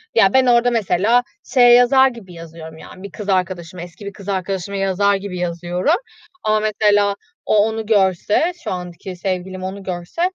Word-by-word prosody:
Ya, - - +4
ben 260 0 +4
orada 245 0 +3
mesela 225 +2 +2 0.3
şeye 245 -3 +7
yazar 245 +2 +6
gibi 230 -8 -9
yazıyorum, 165 -1 -11
yani, 185 +3 -13
bir 200 - -8
kız 205 +1 -7
arkadaşıma, 180 -2 -2
eski 175 +4 -12
bir 200 - -6
kız 200 0 -10
arkadaşıma 195 0 -3
yazar 195 +1 +1
gibi 195 -2 -6
yazıyorum 175 - -1 0.5
ama 215 0 +2
mesela 205 -1 +2 0.3
o - - +2
onu 220 +1 +1
görse, 205 - +2
şu - - -4
anki 180 0 -7
sevgilim 185 0 -4
onu 195 +1 -6
görse, 180 - -5
195 Hz, 170 wpm, -19 LUFS, 180-215 Hz, 0.5 s, şeye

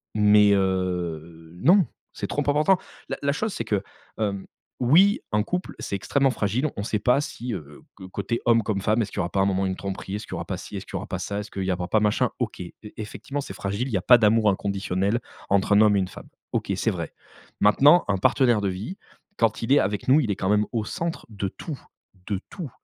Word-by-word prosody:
mais 105 -1 +6
heu, 85 -4 -2
non 185 +1 +6 0.3
c'est - - -4
trop 145 - -1
important. 150 +6 +3 0.3
La - - -2
la 140 - +2
chose 215 +8 -2
c'est 115 - -3
que, 105 -3 0 0.4
hem, 100 -3 -2 0.3
oui 175 - +5
un 105 - +2
couple 180 +6 -3
c'est - - -3
extrêmement 135 +8 +1
fragile 115 +6 0
on 100 - -3
sait 105 -1 -1
pas 125 +6 +3
si, 125 -4 -5
heu, 75 -5 -8
co 95 - -11
côté 115 +5 -3
homme 115 -1 +5
comme 100 -2 -1
femme 110 +3 +2
est-ce 105 -2 -3
qu'il - - -10
y - - +3
aura 85 - -2
pas 100 - 0
un - - +3
moment 95 0 +1
une 95 -1 -2
tromperie, 95 0 -5
est-ce 105 - -6
qu'il - - -8
y - - -1
aura 85 -1 -4
pas 90 +1 -4
ci, 105 - -9
est 95 - -3
ce - - -12
qu'il - - -9
y - - +1
aura - - -6
pas - - -3
ça, 100 0 -3
est-ce 105 0 -6
qu'il 95 - -3
y 95 - 0
aura 90 0 -2
pas 110 - +2
machin 110 +4 +2
OK, 120 -4 -3
e 85 - -7 0.3
effectivement 115 +6 -5
c'est - - -8
fragile 100 +6 -2
il - - -6
y - - +3
a - - -2
pas 125 +6 +7
d'amour 110 -1 +4
inconditionnel 100 +2 0 0.3
entre 100 +1 +3
un 105 - +6
homme 105 -1 +5
et 100 - +3
une 95 - 0
femme. - - -11 0.2
OK, - - -2
c'est - - 0
vrai. - - -5 0.5
Maintenant 145 +11 +6
un 100 - +2
partenaire 120 +2 +3
de 100 - 0
vie 100 - -5 0.4
quand 115 -1 +1
il 115 - -2
est 145 - +6
avec 100 +1 -1
nous 140 +4 +7
il 125 -8 0
est - - 0
quand 95 - -2
même 105 0 +3
au 115 -2 0
centre 170 - -4
de 100 -2 -3
tout 145 - -7 0.5
de 100 -3 -1
tout. 170 -7 -6
105 Hz, 250 wpm, -25 LUFS, 95-125 Hz, 0.5 s, pas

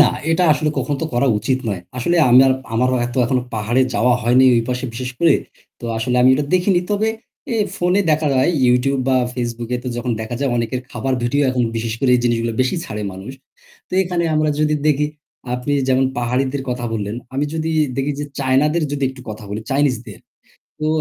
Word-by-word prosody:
না, 150 - +9 0.3
এটা 165 +2 +2
আসলে 150 +1 0
কখনো 145 - -1
তো - - 0
করা 120 +3 +2
উচিত 130 +4 0
নয়। 95 -4 -2 0.2
আসলে 150 +8 +1
আমি 125 +1 +7
আর, 130 - +4 0.2
আমারও 125 +2 +2
এত 120 - -8
এখনো 125 +1 0
পাহাড়ে 110 +4 +1
যাওয়া 125 +1 +3
হয় 120 +2 +2
নি - - +6
ওই 115 - +3
পাশে 125 +1 -2
বিশেষ 125 +2 -4
করে। 170 -1 +5 0.5
তো - - -9
আসলে 125 +2 0
আমি 125 - +6
এটা 145 +2 0
দেখিনি। 180 0 +3
তবে 210 +2 +1 0.4
এ - - 0 0.2
ফোনে 180 +3 +2
দেখা 155 0 +2
যায় 130 +5 +3 0.2
YouTube 125 +2 +2
বা 130 - +3 0.2
Facebook 120 -2 -4
এ - - +1
তো - - -2
যখন 120 0 -2
দেখা 110 +2 -4
যায় 140 -2 +1
অনেকের 120 +2 -1
খাবার 135 0 -2
ভিডিও 140 +5 +1
এখন 125 -1 0
বিশেষ 115 0 -2
করে 135 - +2
এই - - -1
জিনিসগুলো 115 -1 0
বেশি 130 +7 +1
ছাড়ে 105 -1 -5
মানুষ। 95 +7 -8 0.6
তো - - -22
এখানে 175 -1 -1
আমরা 155 0 +2
যদি 150 0 +2
দেখি 150 0 +2 0.5
আপনি 125 +3 -3 0.2
যেমন 130 0 +3
পাহাড়িদের 130 +3 -1
কথা 125 -1 -3
বললেন, 105 0 -3 0.2
আমি 140 +2 0
যদি 160 0 -2 0.3
দেখি 135 +2 0
যে - - -2
চায়নাদের 140 +5 +2
যদি 145 -1 -3
একটু 130 -1 -12
কথা 110 0 -8
বলি 105 +2 -4
চাইনিজদের, 125 -7 0 0.6
তো 155 - -1
130 Hz, 205 wpm, -19 LUFS, 120-145 Hz, 0.6 s, না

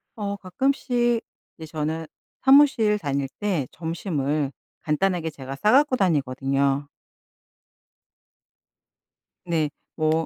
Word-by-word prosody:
어. 200 -2 -3
가끔씩 240 +3 0 0.4
이제 160 - -8
저는 160 +1 -2 0.4
사무실 265 -7 +5
다닐 140 -5 -1
때 185 -11 -1
점심을 155 -4 -2 0.3
간단하게 170 +1 0
제가 135 -3 -8
싸 210 - +4
갖고 280 0 +5
다니거든요. 140 - +1 2.6
네. 160 -4 0 0.3
뭐 160 0 +1
165 Hz, 195 characters per minute, -24 LUFS, 145-210 Hz, 2.6 s, 사무실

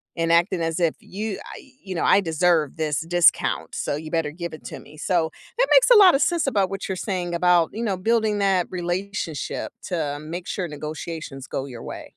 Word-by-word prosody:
and 165 0 0
acting 170 +1 +3
as 165 +1 -1
if 170 -3 +1
you, 210 +1 -5
I - - -9 0.3
you 190 - -5
know, 165 - -1
"I 200 - +5
deserve 165 -3 +1
this 155 -2 -1
discount, 175 +1 +2
so - - -2
you 155 +1 -7
better 165 -3 0
give 170 +1 -6
it 155 - -10
to - - -7
me." 150 +2 -15
So, 160 0 0 0.3
that - - +4
makes - - +6
a - - +10
lot 380 -7 +8
of 275 - +1
sense 340 -5 +1
about 200 -7 +1
what 195 0 -4
you're 190 - -1
saying, 180 -3 -3
about, 175 -1 +3
you 225 - -4
know, 200 -5 -1
building 220 +1 +1
that 190 -3 +2
relationship 180 -3 -3
to 155 -5 -2
make 170 +4 -6
sure 185 -3 -3
negotiations 150 -2 -6
go 135 - -3
your 120 -4 -9
way. - - -7
175 Hz, 210 wpm, -23 LUFS, 160-195 Hz, 0.3 s, a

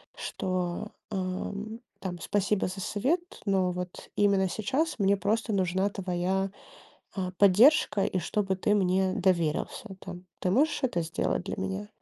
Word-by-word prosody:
что, 185 +2 -3 0.2
а, 185 -1 -2 0.5
там, 180 -2 -5
спасибо 205 +1 +1
за 185 +1 -5
совет, 265 - +1 0.2
но 190 -3 +2
вот 180 0 -6
именно 195 -2 +3
сейчас 270 - -1
мне 200 0 +4
просто 215 +3 0
нужна 190 +1 +1
твоя, 190 0 -1 0.7
а, 185 -2 -2
поддержка 205 +2 +6
и 185 - 0
чтобы 195 +2 0
ты 210 +3 +2
мне 185 -1 +2
доверился, 175 +2 0
там. 180 -1 -8 0.2
Ты 180 - +1
можешь 295 +8 +3
это 175 -9 +1
сделать 60 - -1
для - - -4
меня? 95 +2 -3
190 Hz, 140 wpm, -29 LUFS, 180-205 Hz, 0.7 s, поддержка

